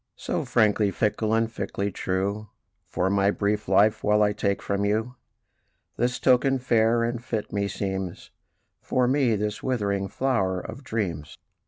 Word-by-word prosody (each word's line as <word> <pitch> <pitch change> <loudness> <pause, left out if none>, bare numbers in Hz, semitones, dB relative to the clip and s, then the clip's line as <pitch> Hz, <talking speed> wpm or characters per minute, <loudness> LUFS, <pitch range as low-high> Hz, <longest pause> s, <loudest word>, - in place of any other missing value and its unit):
"So, - - -3
frankly 105 -2 +3
fickle, 105 +2 0
and 115 0 +2
fickly 100 -3 -4
true, 100 +3 -2 0.4
For 90 - -1
my 100 0 +3
brief 105 +1 -1
life 105 +3 +3
while 105 0 +3
I 105 0 +2
take 100 -1 -1
from 100 0 -2
you 110 +4 0 0.8
This 125 +1 0
token, 135 +1 +3
fair 115 -2 +2
and 120 0 -2
fit, 110 -2 -4
meseems, 95 -2 -3 0.5
For 125 -1 +1
me 130 -3 +2
this 105 +1 -3
withering 100 -6 -1
flower 95 -8 0
of 135 - -9
dreams." 90 - -4
105 Hz, 145 wpm, -25 LUFS, 100-115 Hz, 0.8 s, frankly